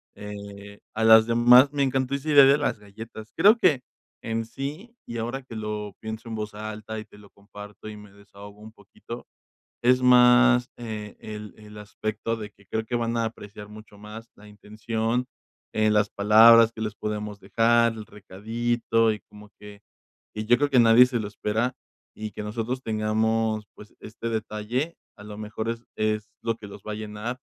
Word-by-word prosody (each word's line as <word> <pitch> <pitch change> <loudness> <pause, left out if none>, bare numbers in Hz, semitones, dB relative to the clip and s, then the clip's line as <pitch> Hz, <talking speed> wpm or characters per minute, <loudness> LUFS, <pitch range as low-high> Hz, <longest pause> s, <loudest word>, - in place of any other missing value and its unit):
eh, 100 0 -10 0.2
a 110 - -1
las 110 0 +8
demás. 125 +4 +6
Me 140 - -1
encantó 130 0 -1
esa 140 +3 -5
idea 140 -2 +8
de 140 +2 +5
las 145 - -1
galletas. 110 +2 -11
Creo 215 +4 +6
que 150 - +3 0.4
en 115 0 -2
sí, 150 - -7
y 115 - -6
ahora 120 +4 -4
que 115 -3 -11
lo 105 -2 -5
pienso 110 +1 -7
en 110 - -4
voz 105 -1 -5
alta 110 +1 -6
y 110 - -9
te - - -18
lo 100 -1 -17
comparto 105 +1 -12
y 105 - -9
me 105 -1 -14
desahogo 100 0 -14
un 110 0 -11
poquito, 110 +4 -11 0.6
es 125 +1 +4
más 125 0 +6
e 110 -3 -7
el 105 -1 -8
el 105 -1 -14
aspecto 110 +2 -4
de 105 -1 -8
que 100 - -25
creo 110 0 -3
que 120 - -3
van 115 0 -1
a 115 - +1
apreciar 105 -2 -9
mucho 105 -1 -14
más 110 +2 -11
la 105 - -16
intención, 110 +3 -3 0.5
eh, 110 0 +2
las 105 -1 +2
palabras 115 +3 +7
que 110 - -9
les 110 -1 -3
podemos 105 -1 -5
dejar, 115 +3 +2
el 110 -1 -9
recadito, 115 +3 -1
y 105 - -9
como 105 0 -15
que 105 0 -13 0.5
y 110 0 -4
yo 120 +2 +4
creo 145 0 +1
que 125 - +5
nadie 115 +2 +7
se 120 -3 -2
lo 105 - -4
espera 110 +4 -2 0.4
y 110 0 -6
que 105 - -7
nosotros 115 +4 -4
tengamos, 110 0 0
pues, 105 - -15
este 115 +1 -6
detalle, 110 +8 -3 0.2
a 105 - -12
lo 105 0 -9
mejor 110 +1 -5
es 115 0 -5
es 110 0 -1
lo 115 -1 -1
que 105 - -11
los 100 0 -11
va 110 - -5
a - - -4
llenar 110 +3 -6
110 Hz, 190 wpm, -25 LUFS, 105-120 Hz, 0.6 s, las